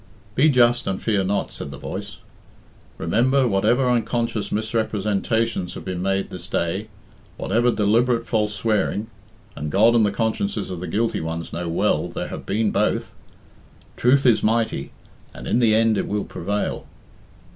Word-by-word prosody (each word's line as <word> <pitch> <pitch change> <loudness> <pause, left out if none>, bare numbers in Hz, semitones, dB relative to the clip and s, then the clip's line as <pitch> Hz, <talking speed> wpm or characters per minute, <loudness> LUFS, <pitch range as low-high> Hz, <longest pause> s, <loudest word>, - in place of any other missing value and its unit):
"Be 145 +8 +4
just 120 -3 +3
and 95 -1 -1
fear 105 -4 +1
not," 100 +1 -1
said - - -6
the 70 - -8
voice. - - -6 0.8
"Remember, 125 +10 +2
whatever 115 +5 +2
unconscious 115 -3 0
misrepresentations 110 -1 -1
have - - -8
been 90 -1 -3
made 95 +1 -1
this - - -7
day, 95 +6 -1 0.5
whatever 120 +5 +1
deliberate 115 +2 +2
false 105 -2 0
swearing 105 +1 -1 0.4
(and 75 +1 -4
God 110 +4 +5
and 115 -2 +4
the 105 - +3
consciences 115 - -1
of 90 - -5
the 90 - -5
guilty 110 +7 0
ones 80 +1 -5
know 85 0 -3
well 85 - +1
there - - -5
have - - -7
been 110 0 +1
both), - - 0 0.8
truth 135 +3 +3
is 120 -4 +5
mighty, 110 -10 0 0.4
and - - -8
in - - +2
the 110 -3 +4
end 110 -2 +3
it - - -2
will 105 0 -2
prevail." 100 +4 -3
110 Hz, 155 wpm, -22 LUFS, 95-115 Hz, 0.8 s, God